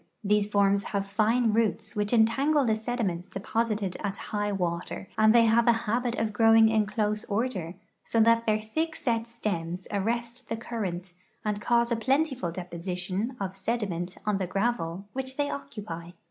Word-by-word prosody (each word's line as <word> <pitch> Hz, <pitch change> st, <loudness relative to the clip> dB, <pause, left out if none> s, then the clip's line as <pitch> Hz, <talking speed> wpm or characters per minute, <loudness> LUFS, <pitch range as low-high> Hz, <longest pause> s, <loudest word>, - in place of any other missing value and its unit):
These 205 Hz, 0 st, +2 dB
forms 200 Hz, -1 st, +2 dB
have 200 Hz, -1 st, -2 dB
fine 220 Hz, +3 st, +2 dB
roots 220 Hz, -1 st, 0 dB
which 210 Hz, 0 st, 0 dB
entangle 270 Hz, +6 st, +3 dB
the 220 Hz, -2 st, +2 dB
sediments 215 Hz, -6 st, -2 dB
deposited 210 Hz, -1 st, -2 dB
at 200 Hz, -1 st, -2 dB, 0.2 s
high 205 Hz, 0 st, 0 dB
water, 180 Hz, -1 st, -3 dB
and 215 Hz, 0 st, +5 dB
they 235 Hz, 0 st, +6 dB
have 230 Hz, +2 st, +4 dB
a 235 Hz, -, +7 dB
habit 240 Hz, +2 st, 0 dB
of 220 Hz, -3 st, -1 dB
growing 225 Hz, 0 st, +6 dB
in 215 Hz, -2 st, +2 dB
close 210 Hz, 0 st, -1 dB
order, 200 Hz, -6 st, -2 dB, 0.3 s
so 230 Hz, -, 0 dB
that 230 Hz, +1 st, +4 dB
their 215 Hz, 0 st, +3 dB
thick 315 Hz, +10 st, -2 dB
set 230 Hz, -3 st, -1 dB
stems 185 Hz, -6 st, -4 dB
arrest 235 Hz, +4 st, -2 dB
the 225 Hz, -, -2 dB
current 190 Hz, -6 st, -4 dB, 0.3 s
and 210 Hz, -1 st, -1 dB
cause 235 Hz, +1 st, +2 dB
a -, -, +3 dB
plentiful 265 Hz, -, +1 dB
deposition 180 Hz, +6 st, -4 dB
of 190 Hz, -1 st, -3 dB
sediment 190 Hz, -4 st, -2 dB
on 210 Hz, -2 st, +1 dB
the 185 Hz, -, -1 dB
gravel 195 Hz, -3 st, -1 dB
which 260 Hz, 0 st, -4 dB
they 290 Hz, 0 st, 0 dB
occupy. 170 Hz, -10 st, -6 dB
215 Hz, 165 wpm, -28 LUFS, 195-235 Hz, 0.3 s, a